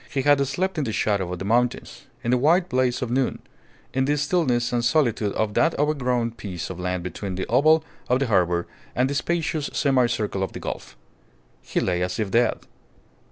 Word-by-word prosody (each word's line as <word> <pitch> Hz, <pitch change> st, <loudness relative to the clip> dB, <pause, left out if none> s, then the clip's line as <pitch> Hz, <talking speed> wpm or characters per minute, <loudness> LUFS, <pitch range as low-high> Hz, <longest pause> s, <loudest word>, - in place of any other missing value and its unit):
He 135 Hz, -, -1 dB
had 145 Hz, -1 st, +4 dB
slept 180 Hz, +6 st, -1 dB
in -, -, 0 dB
the 115 Hz, -, -2 dB
shadow 100 Hz, -4 st, 0 dB
of 90 Hz, -, -3 dB
the 95 Hz, -, -5 dB
mountains, 120 Hz, +3 st, 0 dB, 0.2 s
in 120 Hz, -, 0 dB
the 125 Hz, -, +4 dB
white 170 Hz, +7 st, +3 dB
blaze 125 Hz, -1 st, +1 dB
of 120 Hz, -, -4 dB
noon, 130 Hz, +1 st, +1 dB, 0.6 s
in 130 Hz, 0 st, +1 dB
the 145 Hz, +2 st, +1 dB
stillness 140 Hz, -6 st, +1 dB
and 120 Hz, -1 st, +1 dB
solitude 120 Hz, -6 st, +2 dB
of 110 Hz, -1 st, -1 dB
that 165 Hz, +8 st, +2 dB
overgrown 125 Hz, -5 st, 0 dB
piece 95 Hz, -6 st, -6 dB
of 90 Hz, -, -8 dB
land 90 Hz, -1 st, -2 dB
between 95 Hz, +1 st, -5 dB
the 95 Hz, -, -3 dB
oval 155 Hz, +6 st, +4 dB, 0.3 s
of 125 Hz, -, +4 dB
the 135 Hz, -, 0 dB
harbour 90 Hz, -6 st, +2 dB, 0.3 s
and 130 Hz, +2 st, +2 dB
the -, -, 0 dB
spacious 160 Hz, -1 st, -1 dB
semi 130 Hz, -4 st, +3 dB
circle 105 Hz, -4 st, -2 dB
of 95 Hz, -, -2 dB
the -, -, -6 dB
gulf. -, -, -6 dB, 0.6 s
He -, -, -2 dB
lay 90 Hz, -1 st, 0 dB
as 90 Hz, 0 st, -2 dB
if 105 Hz, -3 st, -1 dB
dead. 120 Hz, +1 st, +2 dB
125 Hz, 205 wpm, -24 LUFS, 100-140 Hz, 0.6 s, had